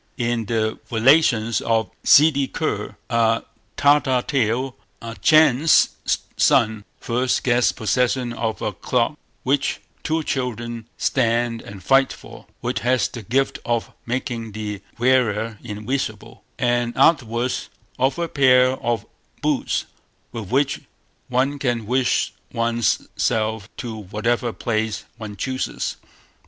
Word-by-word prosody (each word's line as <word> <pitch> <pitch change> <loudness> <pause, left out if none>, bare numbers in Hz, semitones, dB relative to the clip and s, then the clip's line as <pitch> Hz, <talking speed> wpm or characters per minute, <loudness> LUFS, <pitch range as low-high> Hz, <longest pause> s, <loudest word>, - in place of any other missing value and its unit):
In 120 -2 -1
the 110 0 -1
Relations 115 -2 +3
of 115 -1 0
Ssidi 140 -2 +5
Kur, - - -3
a 115 -1 +2 0.3
Tartar 140 -3 +3
tale, 130 0 0 0.2
a 115 -1 -7
Chan's 155 -1 +5 0.5
son 105 -1 +3
first 125 +2 0
gets 120 -1 +3
possession 120 +2 0
of 115 -2 -3
a 105 - -1
cloak 125 - -1 0.2
which 140 +1 0 0.2
two 160 0 -1
children 120 -4 -3
stand 115 -2 +1
and 100 -2 -11
fight 135 +6 +4
for, - - -12
which - - -1
has 125 +1 +1
the 115 - -8
gift 130 +6 0
of 120 -1 -1 0.2
making 120 -3 -3
the 105 -2 -5 0.2
wearer 115 -3 +1
invisible, 110 0 -4
and 120 -1 0
afterwards 125 -5 +2 0.3
of 130 +1 +2
a 170 0 -1
pair 130 -4 +4
of 120 -1 -1 0.4
boots, - - 0 0.5
with 115 -5 -6
which 135 +3 +1 0.5
one 135 +3 0
can 120 -5 -1
wish 125 +2 +1 0.2
one's 115 0 0
self 110 -1 0
to 115 -3 -5
whatever 110 +4 -1
place 110 +1 -2
one 105 -2 -7
chooses. 130 +3 -3
120 Hz, 120 wpm, -22 LUFS, 110-130 Hz, 0.5 s, Ssidi